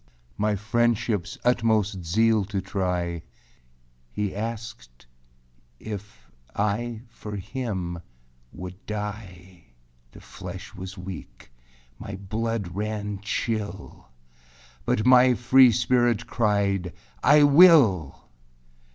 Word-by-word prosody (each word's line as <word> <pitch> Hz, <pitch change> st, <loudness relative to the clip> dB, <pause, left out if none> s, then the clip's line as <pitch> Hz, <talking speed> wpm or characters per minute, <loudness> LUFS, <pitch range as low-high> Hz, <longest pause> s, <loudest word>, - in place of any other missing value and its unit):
My 105 Hz, 0 st, 0 dB
friendshipâs 110 Hz, -2 st, 0 dB
utmost 110 Hz, -6 st, +1 dB
zeal 110 Hz, +5 st, +2 dB
to 100 Hz, 0 st, -3 dB
try, 90 Hz, -3 st, -2 dB, 0.9 s
He 100 Hz, +7 st, -3 dB
asked 105 Hz, -, -7 dB, 0.7 s
if 105 Hz, -1 st, -9 dB, 0.2 s
I 110 Hz, +3 st, -2 dB
for 105 Hz, -2 st, -8 dB
him 95 Hz, -5 st, -4 dB, 0.5 s
would 90 Hz, +1 st, -9 dB
die. 95 Hz, -4 st, -7 dB, 0.5 s
The -, -, -14 dB
flesh -, -, -9 dB
was 95 Hz, +2 st, -8 dB
weak; 90 Hz, -11 st, -10 dB, 0.5 s
my 100 Hz, -, -7 dB
blood 105 Hz, -1 st, -3 dB
ran 105 Hz, 0 st, -3 dB
chill, 105 Hz, -, -4 dB, 0.8 s
But 105 Hz, -, 0 dB
my 125 Hz, 0 st, +6 dB
free 125 Hz, +1 st, +6 dB
spirit 120 Hz, +1 st, +1 dB
cried, 100 Hz, -5 st, 0 dB, 0.3 s
âI 145 Hz, +2 st, +6 dB
will! 140 Hz, -, +5 dB
105 Hz, 90 wpm, -25 LUFS, 95-115 Hz, 0.9 s, my